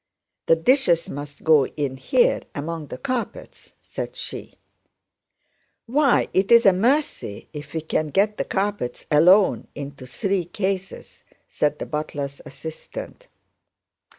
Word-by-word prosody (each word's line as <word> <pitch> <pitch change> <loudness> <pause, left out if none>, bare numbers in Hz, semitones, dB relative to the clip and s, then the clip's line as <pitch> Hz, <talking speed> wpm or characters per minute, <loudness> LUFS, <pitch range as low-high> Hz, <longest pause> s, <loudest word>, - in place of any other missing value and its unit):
"The 165 - +6
dishes 170 - +3
must 145 +1 -8
go 155 -4 +5
in 140 -3 -3
here 485 - +2
among 155 +1 -4
the 125 - -7
carpets," 240 - -5
said - - -6
she. - - -7 1.3
"Why, 275 +2 +3
it's 230 +5 +5
a 195 - +7
mercy 235 - 0
if 150 +1 -9
we 160 - -1
can 155 0 -1
get 200 +8 +1
the - - -1
carpets 200 -9 -2
alone 180 +7 +5
into 140 -2 -8
three 190 - -1
cases," 190 +1 -4 0.2
said 150 0 0
the - - -5
butler's 145 -2 -4
assistant. 160 - -9
165 Hz, 125 wpm, -23 LUFS, 145-205 Hz, 1.3 s, a